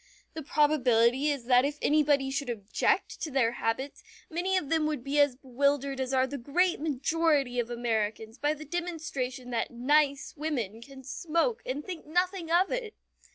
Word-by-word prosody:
The 320 - -5
probability 270 -3 +3
is 280 -5 -2
that 250 0 +5
if 285 +1 -1
anybody 290 -3 +2
should 275 -1 -2
object 215 -3 -1
to 315 - -2
their 260 -5 +2
habits, 240 - -3 0.3
many 365 +3 0
of 300 - -2
them 320 -2 +2
would 300 -5 -3
be 280 +2 0
as 285 -3 +4
bewildered 275 +1 0
as 260 0 -2
are 260 -1 +3
the 280 +1 -6
great 350 +9 +1
majority 290 -3 +1
of 240 -1 -1
Americans 225 -1 -2
by 295 +1 +1
the 310 +1 -10
demonstration 295 -7 -4
that 230 -1 -1
"nice" 280 +3 +1
women 250 -9 -3
can 265 +2 -12
smoke 335 - -1
and 280 +3 -3
think 350 -5 -7
nothing 355 +1 0
of 355 +3 +3
it! 465 -4 -3
280 Hz, 170 wpm, -29 LUFS, 250-310 Hz, 0.3 s, that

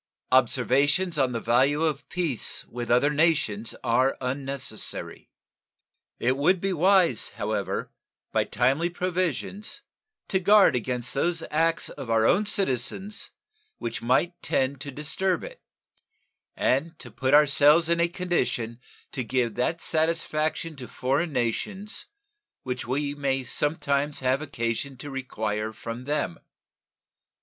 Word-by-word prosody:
Observations 140 +7 +3
on 130 -2 +2
the 115 - -2
value 130 +7 +2
of 150 -3 -2
peace 165 -9 -1
with 120 0 -6
other 125 +5 +4
nations 150 -9 +1
are 130 +2 +2
unnecessary. 135 -2 -4 0.9
It 130 +2 +1
would 175 +6 +3
be 195 +1 -1
wise, 180 - +3
however, - - -2 0.4
by - - +1
timely 135 +8 +1
provisions 185 - -2 0.5
to 190 - +2
guard 200 -5 +5
against 125 0 -1
those 165 +4 0
acts 165 +2 +1
of 125 - -8
our 115 -1 +3
own 205 - +3
citizens 195 - 0 0.5
which 115 - -4
might 130 +9 +2
tend 135 0 0
to 140 - -5
disturb 150 +7 -1
it, - - -10 0.9
and 155 +6 0
to 120 - -11
put 130 +5 +2
ourselves 150 +2 +6
in 170 0 +2
a 170 - +4
condition 165 -10 -2 0.3
to 130 - -3
give 120 -2 0
that 160 +8 -1
satisfaction 160 0 0
to 125 -2 -8
foreign 140 +9 -1
nations 185 - -2 0.6
which 125 -1 -4
we 140 +3 -1
may 135 -2 -1
sometimes 145 +1 0
have 130 +2 +1
occasion 130 -1 -3
to 145 +2 -8
require 110 -5 -3
from 115 +2 -7
them. 145 - -2
140 Hz, 125 wpm, -26 LUFS, 125-165 Hz, 0.9 s, ourselves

